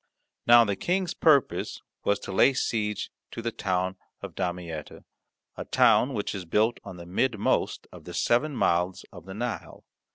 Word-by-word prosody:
Now 120 0 +8
the 100 -3 -1
King's 180 - -1
purpose 145 -5 +2 0.2
was 100 - +2
to - - -6
lay 115 +8 +5
siege 105 -4 -1 0.2
to - - -8
the 115 - -1
town 95 -2 -1 0.3
of - - -6
Damietta, 85 -4 -5 0.5
a - - -6
town 130 +1 +4
which 105 - -2
is 95 - -5
built 105 +7 +1
on 90 - -9
the 85 - -9
midmost 110 +4 0
of - - -13
the - - -8
seven 140 +5 +1
mouths 90 -1 +1
of 90 -3 -12
the 95 0 -8
Nile. 120 +2 -5
105 Hz, 165 wpm, -27 LUFS, 90-120 Hz, 0.5 s, Now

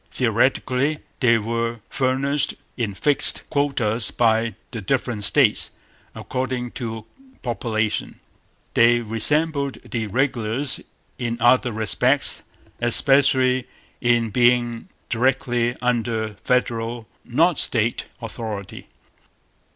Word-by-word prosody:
Theoretically 140 +4 +1 0.2
they 120 -3 +4
were 115 +1 -2
furnished 135 +2 0 0.2
in 110 -5 -3
fixed 145 +6 +2
quotas 125 -7 +1
by 115 -1 +1 0.2
the 115 -3 -5
different 120 0 -2
States, 130 -2 +4 0.5
according 130 -1 -3
to 110 -3 -6 0.4
population. 110 -3 -2 0.5
They 120 +1 +4
resembled 140 +6 +1
the 115 -3 -4
regulars 125 +2 -1 0.4
in 120 -2 -2
other 120 +1 +3
respects, 125 +5 +1 0.4
especially 130 +1 +4 0.3
in 120 -2 +2
being 120 0 +1 0.2
directly 120 -1 0
under 115 -3 -1
Federal, 115 0 -2 0.2
not 165 +7 +2
State, 115 0 +2 0.2
authority. 110 -4 -7
120 Hz, 90 wpm, -22 LUFS, 115-130 Hz, 0.5 s, they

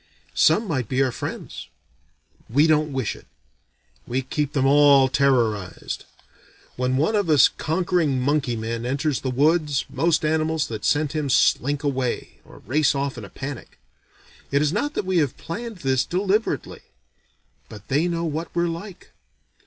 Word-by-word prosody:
Some 225 - +3
might 130 - -2
be 130 +1 +2
our 130 - 0
friends. - - -7 0.8
We 140 +7 +4
don't 155 -1 +2
wish 130 -6 -2
it. - - -16 0.8
We 130 +2 -1
keep 145 +2 -2
them 135 -3 +1
all 140 -1 +6
terrorized. 120 -9 0 0.7
When 125 +1 0
one 160 +11 +1
of 200 -5 0
us 150 -4 +7
conquering 160 -3 0
monkey 140 -1 0
men 115 +1 -4
enters 140 +3 -1
the 130 - -2
woods, 150 +2 +1
most 165 -1 +1
animals 155 0 +1
that 110 -2 -5
scent 150 -1 +1
him 155 -2 -2
slink 145 +3 +2
away, 130 -4 -2
or - - -16
race 145 +1 +2
off 140 0 -2
in 115 - -8
a - - -12
panic. 135 +2 -8 0.7
It 140 +1 +2
is 150 +1 0
not 285 +9 -1
that - - -2
we 185 -1 0
have 145 -5 -1
planned 225 +5 -6
this 130 -1 +2
deliberately: 200 +4 -1 0.9
but 105 -2 -12
they 150 +6 +1
know 170 -1 -2
what 160 +1 -3
we're 170 0 +1
like. 175 +3 -8
145 Hz, 160 wpm, -23 LUFS, 130-160 Hz, 0.9 s, us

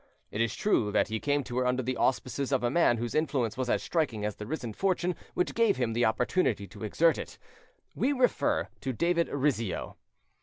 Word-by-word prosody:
It 105 - -1
is 115 -2 0
true 160 - +1
that - - +2
he 110 0 -2
came 145 +2 0
to 125 0 -3
her 125 - +1
under 125 +1 +1
the 130 +1 -1
auspices 130 +2 0
of 135 -3 +1
a 120 - +1
man 155 -7 +4
whose 120 0 -3
influence 135 -8 0
was 130 -1 -2
as - - +1
striking 125 -11 -1
as 105 - -3
the 105 - -7
risen 125 -6 -4
fortune 180 - 0 0.2
which 180 - 0
gave 230 -3 +3
him 120 -3 0
the 120 +1 +2
opportunity 110 - +1
to - - -10
exert 160 +10 +2
it. - - -7 0.6
We 275 - +1
refer 285 +2 +1
to 130 - -3
David 170 +6 +1
Rizzio. 130 -8 -1
130 Hz, 205 wpm, -29 LUFS, 115-170 Hz, 0.6 s, man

